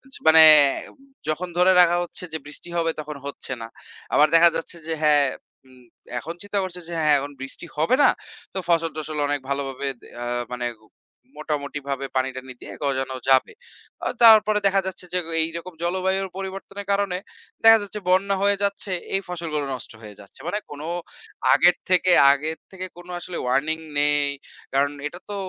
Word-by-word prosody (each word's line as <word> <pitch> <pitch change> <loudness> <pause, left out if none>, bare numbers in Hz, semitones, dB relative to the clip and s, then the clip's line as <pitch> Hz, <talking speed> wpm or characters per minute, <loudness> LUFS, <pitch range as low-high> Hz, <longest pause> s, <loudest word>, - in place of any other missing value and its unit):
য - - -9
মানে 160 0 +9 0.5
অব - - -23 0.3
যখন 175 +4 -2
ধরে 180 +1 +5
রাখা 175 0 +4
হচ্ছে 175 - -8
যে - - -1
বৃষ্টি 150 +4 -9
হবে, 165 -1 +1
তখন 150 0 -8
হচ্ছে 140 - -7
না। 115 - -6 0.5
আবার 150 - +6
দেখা 170 +1 +8
যাচ্ছে 165 +1 -6
যে 160 - 0
হ্যাঁ, 145 -2 +5 0.4
হুম, 130 -1 -19 0.4
এখন 165 +7 -7
চিন্তা 205 0 -2
করছে 180 -1 -6
যে - - -6
হ্যাঁ, 150 -2 +4
এখন 145 +1 -6
বৃষ্টি 135 +5 -5
হবে 160 +11 +3
না। - - +7 0.4
তো 190 - -3
ফসল-টসল 155 -2 0
অনেক 145 0 -1
ভালোভাবে 140 0 -3
দে - - -15 0.2
আ - - -4 0.3
মানে 125 0 -3 0.7
মোটামুটিভাবে 140 -2 -4
পানি-টানি 130 0 -3
দিয়ে - - -9
গজানো 135 -2 -1
যাবে। 130 -1 +4 0.5
অ - - +1 0.2
তারপরে 215 -2 +7
দেখা 195 0 +2
যাচ্ছে 185 -1 -7
যে, 180 - +2
গ - - -6 0.2
এইরকম 170 +2 -5
জলবায়ুর 190 +2 0
পরিবর্তনের 195 +1 -7
কারণে, 200 -2 0 0.5
দেখা 225 0 +9
যাচ্ছে 205 +1 -7
বন্যা 195 +2 +3
হয়ে 200 0 +3
যাচ্ছে, 200 0 -2 0.2
এই 195 - +1
ফসলগুলো 165 -5 -3
নষ্ট 125 - -10
হয়ে 105 -2 -12
যাচ্ছে। 100 -1 -16
মানে 210 - -1
কোনো 150 +2 -7 0.7
আগের 175 +5 +6
থেকে 185 0 +4 0.2
আগের 155 +3 -4
থেকে 185 -1 -6
কোনো 175 +1 -11
আসলে 175 0 -6
Warning 155 +5 0 0.2
নেই। 145 0 +2 0.5
কারণ 140 +1 +2 0.2
এটা 175 +4 -10
তো 205 - -4
165 Hz, 170 wpm, -23 LUFS, 145-185 Hz, 0.7 s, মানে